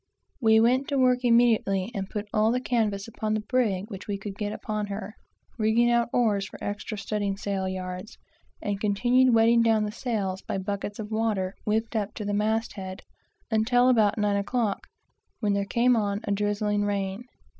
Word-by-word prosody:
We 220 -2 +5
went 255 +4 +3
to 280 - -1
work 255 -1 +4
immediately, 230 -4 +3
and 195 -3 -4
put 210 0 -4
all 215 +1 +3
the 250 - +1
canvas 220 -5 -1
upon 215 -1 -2
the - - 0
brig 205 -7 +1
which 195 -3 -8
we 200 -1 -2
could 195 0 -7
get 205 0 -3
upon 215 -1 -3
her, 200 0 -6 0.5
rigging 225 +2 +3
out 235 0 +2
oars 210 -5 +1
for - - -11 0.4
studding 200 -1 -2
sail 195 -2 -2
yards; 185 +1 -6 0.5
and 205 -1 -2
continued 245 +5 +3
wetting 230 +1 +5
down 225 -2 +3
the 210 - -3
sails 205 -5 -3
by - - -4
buckets 200 +1 -4
of 215 0 -6
water 215 -4 0
whipped 220 +2 -1
up 210 -1 -2
to 210 - -5
the 205 - -1
mast 220 +2 0
head, 190 -1 -7 0.5
until 245 +3 +3
about 220 -4 +3
nine 205 -1 +1
o'clock, 210 0 -1 0.5
when 210 -3 +1
there 200 0 0
came 240 +4 +3
on 205 -2 -1
a - - -3
drizzling 205 0 0
rain. 200 0 -2
210 Hz, 180 wpm, -26 LUFS, 200-230 Hz, 0.5 s, We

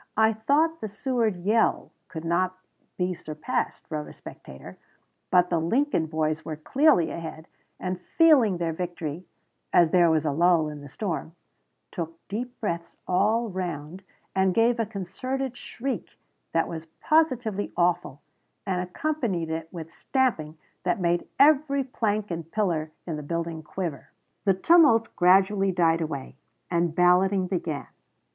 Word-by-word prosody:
"I 220 0 +4
thought 295 +9 +1
the 215 - -3
Seward 225 -1 -1
yell 220 +4 +2 0.2
could 160 -1 -7
not 185 +2 0 0.4
be 180 0 0
surpassed," 155 -3 -4
wrote 150 -1 -3
a - - -11
spectator; 65 - -12 0.5
"but 180 -1 +4
the 170 - +2
Lincoln 200 - +1
boys 155 -1 -1
were 160 - -5
clearly 180 - +3
ahead, 160 -1 -7 0.3
and, 185 -1 -3 0.2
feeling 275 - +6
their 165 -1 -1
victory, 170 -1 -5 0.4
as 170 -2 +5
there 175 -2 +5
was 160 -1 +2
a 150 - +1
lull 165 0 +3
in 150 -1 -8
the 145 - -10
storm, 170 +1 -4 0.6
took 165 -1 -5
deep 245 +4 -5
breaths 170 -6 -4
all 220 +5 +2
round, 175 -2 -5 0.3
and 190 -1 +2
gave 230 +1 +3
a 225 - 0
concentrated 240 +7 -4
shriek 245 -4 -5 0.3
that 165 - +1
was 165 -1 -7
positively 250 -10 +1
awful, 170 -5 0 0.4
and 185 -2 0
accompanied 185 - -2
it 160 0 -4
with 165 -2 -8
stamping 190 - -1 0.2
that - - 0
made 175 -1 0
every 280 -1 +4
plank 215 -5 -2
and 165 -1 -5
pillar 170 -8 0
in 165 -3 -4
the - - -5
building 165 +1 -3
quiver." 160 -1 -5 0.4
The 195 -2 +4
tumult 290 - +5
gradually 195 +2 +4
died 165 -2 +2
away, 140 -4 -5 0.3
and 170 -2 +1
balloting 185 +2 +4
began. 170 -5 -3
180 Hz, 145 wpm, -26 LUFS, 165-220 Hz, 0.6 s, feeling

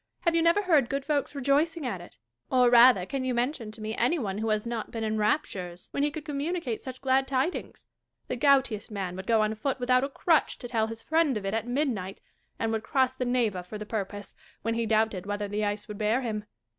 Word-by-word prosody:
Have 340 - +2
you 335 - +3
never 335 +5 +3
heard 305 -10 +3
good 275 0 -2
folks 295 -1 -1
rejoicing 290 +4 +1
at 195 -8 -3
it? 175 - -14 0.3
Or, 250 -2 +4
rather, 240 -6 +7
can 265 +6 -3
you 255 -1 -1
mention 245 -1 -1
to 215 +1 -11
me 215 +1 -3
any 250 +9 +2
one 205 -7 -3
who 220 +1 -1
has 215 0 0
not 235 -2 -3
been 225 -1 -4
in 220 0 -1
raptures 190 - -1
when 280 - -1
he 295 - +2
could 300 +1 -7
com 285 -2 -3
municate 300 -7 -2
such 260 -1 -8
glad 265 0 +2
tidings 270 +6 -2 0.4
1 250 - -4
The - - -11
goutiest 265 -7 +3
man 195 -4 -4
would 190 - -7
go 225 -2 +4
on 215 0 0
foot 260 +5 -2
without 255 +1 +3
a 275 - -1
crutch 320 +3 +2
to 245 - -7
tell 225 -2 0
his 225 0 -8
friend 315 -6 +2
of 200 - -6
it 195 - -1
at 225 +1 -1
midnight; 245 -8 -1 0.4
and 225 0 -1
would 220 -1 -1
cross 260 +1 +1
the 260 -1 -3
Neva 235 -7 +1
for 180 +4 -8
the 210 - -6
purpose, 205 -1 -5 0.3
when 230 - 0
he 230 0 -1
doubted 215 -4 +1
whether 205 0 -2
the 210 +1 -2
ice 205 0 -2
would 210 -2 -7
bear 220 +4 +2
him. 215 -4 -3
235 Hz, 245 wpm, -28 LUFS, 215-275 Hz, 0.4 s, rather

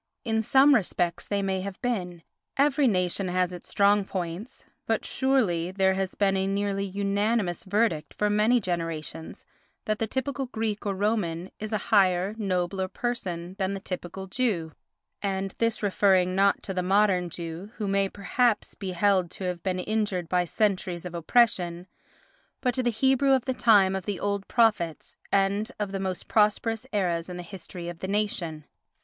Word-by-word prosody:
In 220 -1 +1
some 270 +6 +5
respects 175 -6 0
they 200 -1 0
may 190 -1 -1
have 195 0 -6
been—every 245 - -1
nation 185 -2 +1
has 180 0 0
its 175 - -10
strong 200 0 +4
points—but 190 +6 -5
surely 220 -11 +1
there 190 0 +2
has 190 -1 -2
been 195 -1 +2
a 190 0 0
nearly 200 0 -1
unanimous 200 0 0
verdict 200 -5 0
for 210 - +1
many 210 +4 +3
generations 165 -4 -4 0.4
that 215 0 -1
the 225 - 0
typical 265 +3 -2
Greek 220 -3 -3
or 200 - -1
Roman 190 -4 -1
is 215 +1 -5
a 215 - +1 0.2
higher, 190 -1 +4
nobler 185 -1 -1
person 185 -7 -4
than 195 +1 0
the - - -4
typical 185 0 -6
Jew—and 195 -1 -3
this 230 -1 0
referring 190 -2 +3
not 195 +1 +3
to 195 - -4
the 185 - 0
modern 185 -1 +2
Jew, 170 +3 -6
who 210 - -3
may 195 0 +1
perhaps 215 +3 0
he 190 -2 -4
held 185 -1 +2
to 190 - -8
have 180 -2 -3
been 185 0 -1
injured 200 -2 -1
by 180 +1 +1
centuries 185 -1 -1
of 180 - -6
oppression, 175 -1 +2 0.7
but 250 -2 0
to 255 - 0
the 245 - +1
Hebrew 265 +4 +3
of 260 -2 +2
the 260 - 0
time 205 -6 +4
of 190 - -5
the 205 -2 -2
old 200 -1 -2
prophets 210 -9 +1 0.2
and 200 +4 +1
of 205 -2 -2
the 195 - -3
most 190 -2 -4
prosperous 225 +2 +1
eras 175 -4 0
in 180 - -6
the 175 - -6
history 175 -1 -8
of 175 -1 -7
the 190 - -4
nation. 185 -7 -2
195 Hz, 165 wpm, -27 LUFS, 180-215 Hz, 0.7 s, some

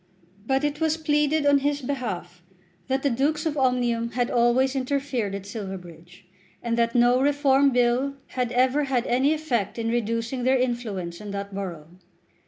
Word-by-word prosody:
But 270 +1 +1
it 295 +1 -2
was 320 0 +2
pleaded 300 -1 +1
on 285 -1 +5
his 285 +1 0
behalf 200 -10 -4 0.5
that 265 +1 -1
the 280 - +3
Dukes 300 +6 0
of 310 -2 -1
Omnium 245 -3 0
had 245 -1 0
always 245 +3 +3
interfered 260 -6 -1
at 195 -1 -7
Silverbridge, 180 -5 -9 0.4
and 235 -1 0
that 235 0 +1
no 245 +1 +4
Reform 280 -1 +3
Bill 250 +2 +1
had 250 -2 -2
ever 260 +4 +2
had 260 -3 0
any 260 +4 +2
effect 250 -11 -1
in 230 0 -1
reducing 230 +2 -1
their 260 +1 +3
influence 215 -9 -3
in 210 - -7
that 200 0 -5
borough. 175 -3 -7
245 Hz, 165 wpm, -25 LUFS, 225-275 Hz, 0.5 s, on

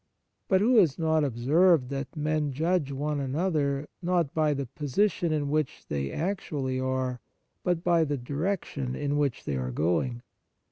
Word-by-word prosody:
But 190 -1 +3
who 240 +3 +4
has 165 -10 +5
not 160 -1 +2
observed 140 +4 +3
that 140 +3 -5
men 150 -1 0
judge 160 0 0
one 145 +2 -2
another, 145 0 0
not 175 -4 +1
by 155 -2 +2
the 140 0 -2
position 155 - 0
in 150 -2 0
which 155 -2 -1
they 70 -2 -2
actually 150 -7 -2
are, 130 -1 -1 0.4
but 175 -2 0
by 170 -2 +4
the 145 -1 -1
direction 140 -1 -3
in 145 0 -1
which 140 -4 0
they 70 - -2
are 65 -1 -2
going 90 - 0
145 Hz, 155 wpm, -28 LUFS, 130-165 Hz, 0.4 s, has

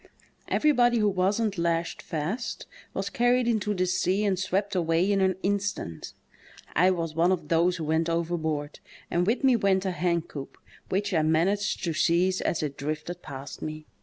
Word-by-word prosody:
Everybody 245 -6 +3
who 210 -2 +3
wasn't 195 +1 0
lashed 170 0 -1
fast 170 +10 -4 0.3
was - - -3
carried 245 -1 +2
into 210 -3 0
the 185 0 +1
sea 185 +3 +1
and 190 -3 +1
swept 195 +2 -1
away 170 +2 +2
in 200 -1 +2
an 190 -1 +2
instant. 200 - -2 0.6
I 180 +4 +5
was 165 -4 -1
one 170 +3 +3
of 165 -5 -2
those 170 +2 +3
who 165 - -4
went 160 +2 +1
overboard, 160 -3 -2 0.3
and 175 +1 +1
with 230 +5 +1
me 260 -2 +5
went 195 -3 +2
a 190 - 0
hencoop, 170 -5 -2 0.3
which 200 +1 -1
I 160 - +3
managed 170 +7 +1
to 170 - 0
^ize 175 +4 +2
as 165 - -1
it 145 -2 -4
drifted 155 +4 -4
past 135 -2 -8
me. 155 0 -6
180 Hz, 170 wpm, -27 LUFS, 165-200 Hz, 0.6 s, I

